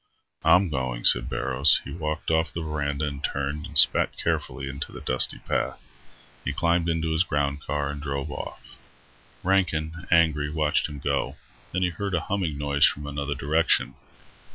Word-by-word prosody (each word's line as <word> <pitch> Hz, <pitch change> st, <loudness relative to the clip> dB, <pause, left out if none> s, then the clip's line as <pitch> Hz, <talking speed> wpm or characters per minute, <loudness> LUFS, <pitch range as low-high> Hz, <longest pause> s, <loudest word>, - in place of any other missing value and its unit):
"I'm 90 Hz, 0 st, +5 dB
going," 65 Hz, -3 st, -3 dB
said -, -, +5 dB
Barrows. 70 Hz, +2 st, +3 dB
He -, -, -8 dB
walked 80 Hz, -1 st, -3 dB
off 80 Hz, 0 st, +1 dB
the 85 Hz, -, -5 dB
verandah 75 Hz, -1 st, -2 dB
and 70 Hz, -1 st, -6 dB
turned 70 Hz, +2 st, -3 dB
and -, -, -2 dB
spat -, -, +6 dB
carefully 70 Hz, -, -2 dB
into 70 Hz, +1 st, -5 dB
the -, -, -9 dB
dusty 65 Hz, -, +3 dB
path. -, -, -2 dB, 0.6 s
He -, -, -2 dB
climbed 85 Hz, 0 st, +1 dB
into 80 Hz, -1 st, -1 dB
his 80 Hz, +1 st, +3 dB
ground 75 Hz, -4 st, -1 dB
car 70 Hz, 0 st, -2 dB
and 70 Hz, 0 st, -7 dB
drove 70 Hz, 0 st, -4 dB
off. -, -, -7 dB, 0.8 s
Rankin, 85 Hz, -3 st, 0 dB
angry, 80 Hz, -3 st, +3 dB
watched 75 Hz, 0 st, 0 dB
him 75 Hz, -, -8 dB
go. 70 Hz, 0 st, -2 dB, 0.4 s
Then 90 Hz, +1 st, -1 dB
he 90 Hz, -, +2 dB
heard 100 Hz, +1 st, -3 dB
a 85 Hz, -, 0 dB
humming 90 Hz, -7 st, -2 dB
noise 70 Hz, 0 st, +4 dB
from 75 Hz, -, -3 dB
another 70 Hz, 0 st, -3 dB
direction. 75 Hz, -1 st, +1 dB
75 Hz, 170 wpm, -25 LUFS, 70-80 Hz, 0.8 s, spat